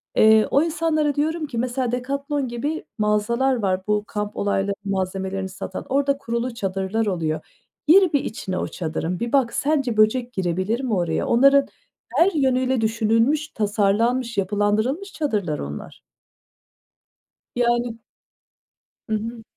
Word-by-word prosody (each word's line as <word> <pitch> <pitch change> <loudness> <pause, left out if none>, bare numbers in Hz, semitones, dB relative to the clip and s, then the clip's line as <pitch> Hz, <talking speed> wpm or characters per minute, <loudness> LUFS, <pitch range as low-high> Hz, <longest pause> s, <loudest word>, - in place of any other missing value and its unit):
Eee, 220 0 +6
o 280 - +4
insanlara 315 -3 0
diyorum 315 +2 0
ki 245 - -6
mesela 250 0 -1
Decathlon 280 +3 -2
gibi 285 +7 -3
mağazalar 225 +5 +1
var, 190 -5 0
bu 210 0 +1
kamp 210 0 -4
olayları 200 0 0
malzemelerini 190 0 -2
satan. 190 0 -6
Orda 280 +1 +2
kurulu 235 -1 -3
çadırlar 195 0 -2
oluyor. 165 -6 -1 0.5
Gir 370 +1 +6
bir 285 - +2
içine 190 -3 -4
o - - -2
çadırın, 165 +1 -3
bir 235 +1 -3
bak, 260 -4 +3
sence 275 -6 0
böcek 240 +3 +3
girebilir 185 +5 -1
mi 250 -4 -1
oraya? 175 -4 0
Onların 275 +3 +5 0.5
her 360 +4 +5
yönüyle 260 -4 +1
düşünülmüş, 225 +7 +2
tasarlanmış, 225 +2 0
yapılandırılmış 210 - 0
çadırlar 205 - -1
onlar. 70 +1 -7 1.5
Yani 240 -1 0 1.1
Hı - - -1
hı. 225 +2 -5
230 Hz, 130 wpm, -23 LUFS, 200-270 Hz, 1.5 s, Eee